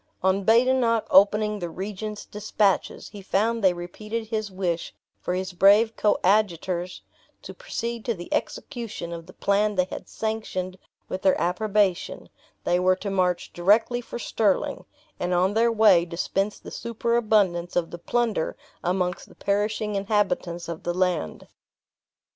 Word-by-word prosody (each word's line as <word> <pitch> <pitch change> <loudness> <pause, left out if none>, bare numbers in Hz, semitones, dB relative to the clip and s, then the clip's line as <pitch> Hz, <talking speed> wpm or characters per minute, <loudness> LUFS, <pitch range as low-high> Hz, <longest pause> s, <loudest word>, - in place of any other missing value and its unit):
On 190 +1 +2
Badenoch 230 +1 +3
opening 210 +2 +4
the 175 -2 -4
regent's 205 +4 -6
dispatches, 210 -1 0
he 205 - -10
found 220 +4 0
they 190 - +6
repeated 215 +6 -5
his 215 -2 -2
wish 180 -3 -3 0.2
for 180 - -2
his 185 0 -3
brave 205 +5 +5
coadjutors 185 -3 +1 0.4
to - - -8
proceed 235 - -5
to 235 - 0
the 175 -1 -7
execution 225 -10 -4
of 165 0 -8
the 185 - -13
plan 205 +1 +1
they 185 - +3
had - - -7
sanctioned 190 -4 -4 0.3
with 185 - -4
their 190 - +3
approbation; 195 +1 0 0.3
they 175 +1 +2
were 185 +1 +3
to 200 +2 -5
march 180 -2 0
directly 215 +7 +3
for 240 - -7
Stirling, 230 +5 0 0.3
and 180 0 0
on 185 +3 +2
their 230 +2 +3
way 210 -6 +5
dispense 185 +4 -2
the - - -11
superabundance 215 -6 0
of 170 -2 0
the 170 - -7
plunder 225 -2 -1 0.3
amongst 180 0 -1
the - - -17
perishing 210 +1 -1
inhabitants 195 -4 -1
of 170 -1 -5
the 175 - -2
land. 180 - -1
200 Hz, 145 wpm, -25 LUFS, 180-220 Hz, 0.4 s, they